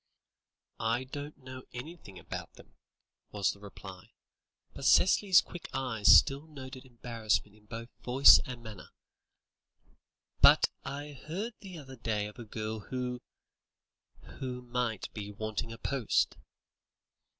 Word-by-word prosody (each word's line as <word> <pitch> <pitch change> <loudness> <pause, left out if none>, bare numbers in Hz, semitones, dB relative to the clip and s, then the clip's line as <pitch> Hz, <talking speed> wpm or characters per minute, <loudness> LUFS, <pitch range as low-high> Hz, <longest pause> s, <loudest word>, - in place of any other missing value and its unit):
"I 115 +3 0
don't 145 +3 -7
know 130 -1 -10
anything 120 - -9
about - - -7
them," - - -17 0.6
was 100 -2 0
the 100 - -13
reply, 95 -2 -11 0.6
but - - -9
Cicely's 190 +2 +6
quick 175 - -9
eyes 115 -7 +3
still 140 +3 +1
noted 130 -3 -10
embarrassment 115 -4 -2
in 105 0 -23
both 115 +1 -7
voice 130 +3 +8
and 125 -2 -7
manner, 110 -4 -10 1.5
"but - - +7
I 145 +2 -6 0.2
heard 205 +9 -3
the 190 -4 -10
other 135 -3 -11
day 105 -3 -1
of 105 +4 -10
a 120 - -7
girl 110 0 -4
who 125 +2 -4 1.2
who 125 -1 -5
might 120 -4 -3
be 105 -2 -6
wanting 110 +2 -4
a 115 - -8
post." 135 -2 0
125 Hz, 130 wpm, -31 LUFS, 110-135 Hz, 1.5 s, voice